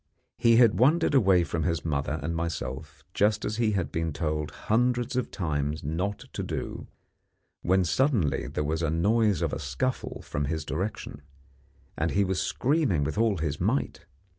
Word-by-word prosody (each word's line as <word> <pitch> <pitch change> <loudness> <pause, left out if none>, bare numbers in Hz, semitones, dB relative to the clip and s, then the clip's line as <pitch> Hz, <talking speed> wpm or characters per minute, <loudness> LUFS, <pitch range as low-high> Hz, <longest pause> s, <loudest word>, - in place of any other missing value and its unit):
He 115 -1 +5
had 115 -5 +5
wandered 155 +6 +4
away 95 -9 +5
from 85 -1 -2
his 85 +1 -1
mother 75 -1 -1
and 85 +2 -2
myself, 80 -5 -4
just 105 +1 +2
as 105 - -2
he 115 -3 +2
had 95 -3 -1
been 80 0 -1
told 75 -2 -2
hundreds 120 - 0
of 125 -3 -1
times 75 -4 -2
not 90 +8 -3
to - - -3
do, - - -5 0.7
when 95 +1 +3
suddenly 95 - +1
there 75 - -2
was 80 +2 -1
the 80 - +1
noise 105 +3 +2
of - - -1
a - - -2
scuffle 80 - -3
from 70 +1 -2
his 80 +1 -3
direction, 90 -4 -4 0.7
and 80 +2 0
he 100 +3 +2
was 95 -1 -1
screaming 130 - +1
with 80 +9 -2
all 110 -4 +2
his 80 -3 -3
might. - - -1
90 Hz, 170 wpm, -27 LUFS, 75-110 Hz, 0.7 s, He